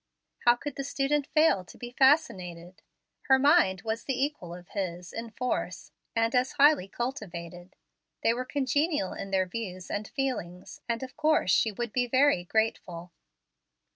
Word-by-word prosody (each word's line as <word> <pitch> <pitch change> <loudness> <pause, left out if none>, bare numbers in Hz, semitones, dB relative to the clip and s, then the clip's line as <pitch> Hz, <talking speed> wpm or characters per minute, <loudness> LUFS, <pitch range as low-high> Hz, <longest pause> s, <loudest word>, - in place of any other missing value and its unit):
How 240 0 +7
could 285 +3 -7
the 275 - -2
student 280 +1 0
fail 305 - +3
to 180 - -15
be 240 -1 -8
fascinated? 185 - +1 0.5
Her 265 - +6
mind 265 - +4
was 225 0 -3
the 270 -2 -2
equal 265 - -2
of 175 0 -13
his 180 -3 -5
in 230 0 -5
force, 190 -9 -3 0.2
and 230 +1 +1
as 255 +1 +1
highly 290 -8 +4
cultivated. 185 - -6 0.5
They 230 - +4
were 250 +2 -3
congenial 285 - 0
in 195 - -6
their 190 -1 +1
views 185 -2 -6
and 205 0 -3
feelings, 210 -10 -4
and 235 +1 -1
of 255 - -8
course 310 -10 +2
she 220 - +3
would 235 +1 -5
be 250 -1 +1
very 260 -6 +3
grateful. 180 -4 -2
230 Hz, 160 wpm, -28 LUFS, 185-270 Hz, 0.5 s, How